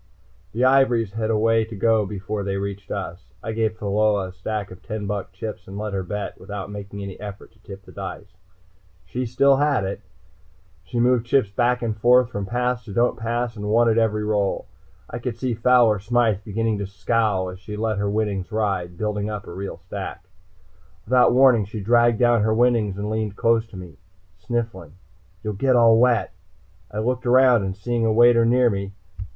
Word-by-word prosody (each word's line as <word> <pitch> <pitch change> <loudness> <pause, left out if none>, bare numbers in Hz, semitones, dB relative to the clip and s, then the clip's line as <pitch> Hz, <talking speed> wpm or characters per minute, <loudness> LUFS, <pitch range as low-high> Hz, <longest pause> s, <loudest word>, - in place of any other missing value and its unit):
The 120 +5 +1
ivories 125 -5 +3
had 110 0 -2
a 110 - +2
way 115 +1 +3
to 110 0 -8
go 110 0 +2
before 100 +1 -4
they 100 0 -2
reached 100 0 -5
us. 95 -3 -6 0.2
I 110 - -3
gave 110 -1 -1
Pheola 105 -1 +1
a - - -9
stack 100 +2 -5
of 90 - -12
ten 110 -2 -5
buck 100 -1 -4
chips 95 0 -7
and 95 +1 -8
let 105 -1 -4
her 95 - -1
bet, 100 +3 -5
without 100 -1 -7
making 100 0 -7
any 100 -1 -8
effort 100 -1 -9
to 110 - -28
tip 95 -2 -11
the - - -14
dice. 100 +1 -8 0.7
She 125 +8 -4
still 135 +3 +4
had 145 -6 +2
it. 95 +1 -4 0.8
She 120 +5 -4
moved 120 -1 +3
the - - -21
chips 125 -8 +2
back 125 +4 +1
and 110 -2 -1
forth 125 +2 +4
from 100 -3 -4
"Pass" 125 +1 -1
to 100 - -8
"Don't 120 +1 +2
Pass" 120 0 -2
and 105 -1 -5
won 115 +2 +4
at 115 0 +3
every 105 -1 +1
roll. 105 -2 0 0.4
I 120 - -6
could 120 -1 -4
see 125 0 -2
Fowler 115 -2 +4
Smythe 110 -1 +1
begin 110 +1 -1
to 100 - -3
scowl 100 0 0
as 90 0 -9
she 105 +1 -8
let 110 -1 -1
her 100 0 0
winnings 105 -2 -2
ride, 95 -5 -2
building 105 0 -2
up 105 -2 -5
a - - -9
real 100 +2 -6
stack. - - -8 0.8
Without 125 +1 +4
warning 125 -4 +5
she 110 +3 -7
dragged 120 +2 +3
down 120 -1 +3
her 110 +1 +1
winnings 115 -5 +2
and 100 +1 -3
leaned 110 -2 -2
close 115 0 +2
to 105 - -11
me, 90 -5 -10 0.4
sniffling. 110 - -4 0.5
"You'll 105 - -3
get 130 +6 +1
all 115 -2 +6
wet!" 120 -2 +2 0.6
I 105 - -8
looked 125 +3 -1
around, 120 -6 +4
seeing 120 +3 -2
a 110 - +2
waiter 115 +1 +5
near 125 0 +4
me. 100 0 -4
110 Hz, 200 wpm, -23 LUFS, 100-120 Hz, 0.8 s, all